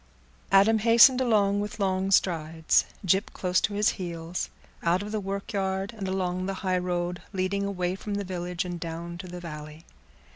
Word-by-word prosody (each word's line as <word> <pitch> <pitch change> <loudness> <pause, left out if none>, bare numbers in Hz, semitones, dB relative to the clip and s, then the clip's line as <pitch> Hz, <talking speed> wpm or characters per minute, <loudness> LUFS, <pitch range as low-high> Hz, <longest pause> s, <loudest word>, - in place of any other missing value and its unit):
Adam 205 +3 +5
hastened 235 +3 +7 0.4
with 210 +1 -5
long 190 -1 0
strides, 160 -4 +2 0.2
Gyp 190 +3 +2
close 185 0 +1
to 205 - -1
his 210 +1 +3
heels, 170 0 -4 0.3
out 175 +3 +1
of 210 - -6
the 215 - -1
workyard, 195 0 -3
and 200 -3 -4
along 185 -1 -1
the 195 - -2
highroad 180 -1 -1
leading 195 +1 -1
away 180 -2 -1
from 200 +2 -5
the 200 - -2
village 180 -1 -3
and 175 -1 -5
down 170 +1 -5
to 185 - -7
the 180 0 -7
valley. 150 -1 -9
185 Hz, 160 wpm, -27 LUFS, 175-200 Hz, 0.4 s, hastened